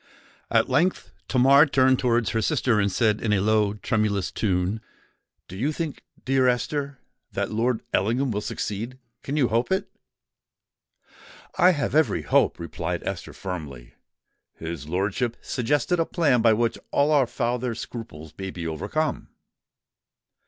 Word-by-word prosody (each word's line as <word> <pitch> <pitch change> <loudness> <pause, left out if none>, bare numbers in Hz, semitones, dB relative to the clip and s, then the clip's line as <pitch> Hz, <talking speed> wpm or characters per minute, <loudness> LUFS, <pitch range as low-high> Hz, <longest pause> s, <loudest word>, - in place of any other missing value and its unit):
At - - +3
length 180 +5 +1 0.2
Tamar 135 +4 +6
turned 130 -2 +3
towards 120 -2 +1
her 110 - 0
sister, 115 +1 +1
and 100 -1 +1
said 105 +2 +1
in 110 - 0
a 100 - +3
low, 105 0 +2
tremulous 105 -3 0
tune, 95 +1 -1 0.7
"Do 90 - -9
you 130 +10 0
think, 155 -2 -4 0.2
dear 130 -1 +3
Esther, 140 +3 -1 0.4
that - - -2
Lord 115 +2 0
Ellingham 120 +7 +1
will 105 -1 -2
succeed—can 120 +7 -5
you 130 -5 +3
hope 120 +8 0
it?" 190 - 0 1.6
"I 185 0 +5
have 145 -3 -2
every 155 0 +2
hope," - - +2
replied 85 -1 -4
Esther, - - -5
firmly. 70 -10 -7 0.6
"His 80 -3 -6
lordship 100 +7 -1
suggested 145 +7 0
a 165 - +2
plan 145 -9 +2
by 115 -1 +5
which 115 +1 0
all 145 +2 +2
our 140 -4 +4
father's 120 -1 -2
scruples 80 -10 -8
may 95 0 -4
be 90 -2 -6
overcome." 100 - -2
115 Hz, 140 wpm, -25 LUFS, 100-135 Hz, 1.6 s, Tamar